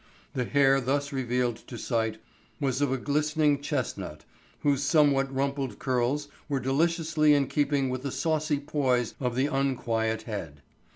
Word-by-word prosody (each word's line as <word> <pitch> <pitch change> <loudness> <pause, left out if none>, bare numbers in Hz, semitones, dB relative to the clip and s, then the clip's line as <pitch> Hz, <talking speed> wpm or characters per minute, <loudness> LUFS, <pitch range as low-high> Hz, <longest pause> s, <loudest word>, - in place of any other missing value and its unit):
The 125 - -1
hair 135 +1 +4
thus 140 +3 -1
revealed 125 -2 0
to 120 - -7
sight 110 -2 -1 0.4
was 135 -2 0
of 145 -2 +2
a 135 - +1
glistening 150 +1 +1
chestnut, 105 - -3 0.4
whose 140 -2 +2
somewhat 140 -2 +3
rumpled 135 -1 -2
curls 130 +3 0 0.2
were 140 -2 0
deliciously 155 +3 +2
in 140 -1 +3
keeping 140 -1 +1
with 130 0 -3
the 140 0 -3
saucy 155 -1 0
poise 130 -5 0
of 125 -3 -1
the 130 +2 +2
unquiet 115 -6 0
head. 85 - -6
135 Hz, 150 wpm, -28 LUFS, 125-145 Hz, 0.4 s, hair